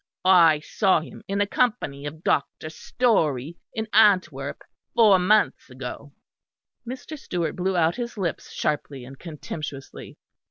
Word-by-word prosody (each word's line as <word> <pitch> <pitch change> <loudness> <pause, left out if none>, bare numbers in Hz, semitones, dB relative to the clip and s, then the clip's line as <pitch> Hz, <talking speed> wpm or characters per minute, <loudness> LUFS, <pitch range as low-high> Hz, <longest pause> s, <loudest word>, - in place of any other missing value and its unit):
I 165 -5 +6
saw 190 +1 +2
him 160 - -11
in 195 - -2
the 205 - +2
company 200 - -1
of 155 +3 -9
Dr. 155 +2 -1
Storey 160 - 0
in 220 0 -4
Antwerp, 185 -10 +3 0.3
four 210 -5 +6
months 210 -1 +2
ago." 130 +2 -8 0.8
Mr. 260 +5 -7
Stewart 170 - -3
blew 185 0 -1
out 165 +3 +2
his 235 -2 -5
lips 180 -5 -3
sharply 140 -3 -3
and 135 +1 -12
contemptuously. 150 -3 -8
170 Hz, 130 wpm, -24 LUFS, 145-205 Hz, 0.8 s, I